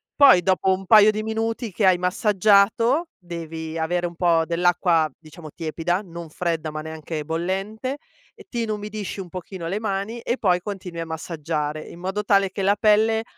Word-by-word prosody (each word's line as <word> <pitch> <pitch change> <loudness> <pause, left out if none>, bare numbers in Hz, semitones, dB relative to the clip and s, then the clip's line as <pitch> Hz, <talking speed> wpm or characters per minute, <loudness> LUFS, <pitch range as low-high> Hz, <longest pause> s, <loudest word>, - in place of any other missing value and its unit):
poi 265 -12 +7
dopo 190 0 +2
un 190 0 -1
paio 215 +1 +7
di 215 0 -4
minuti 225 0 -2
che 195 0 +1
hai 185 - +5
massaggiato, 210 - +3
devi 165 -2 -7
avere 175 +2 0
un 170 0 -5
po' 170 -2 +3
dell'acqua 170 -2 +2
diciamo 155 0 -12
tiepida, 170 +3 -2
non 170 -3 -9
fredda, 165 -1 -2
ma 155 0 -5
neanche 160 0 -6
bollente, 195 - -3 0.5
ti 240 -2 -3
inumidisci 210 -2 -4
un 180 -2 -7
pochino 180 -1 -7
le 200 +5 -2
mani 210 +2 -3
e 240 - -1
poi 180 -3 +2
continui 185 -4 -6
a 165 - -4
massaggiare, 155 -2 -3
in - - -11
modo 190 +3 -3
tale 195 -2 +3
che 195 - -4
la 200 +2 +3
pelle 220 +1 +3
185 Hz, 170 wpm, -23 LUFS, 165-210 Hz, 0.5 s, poi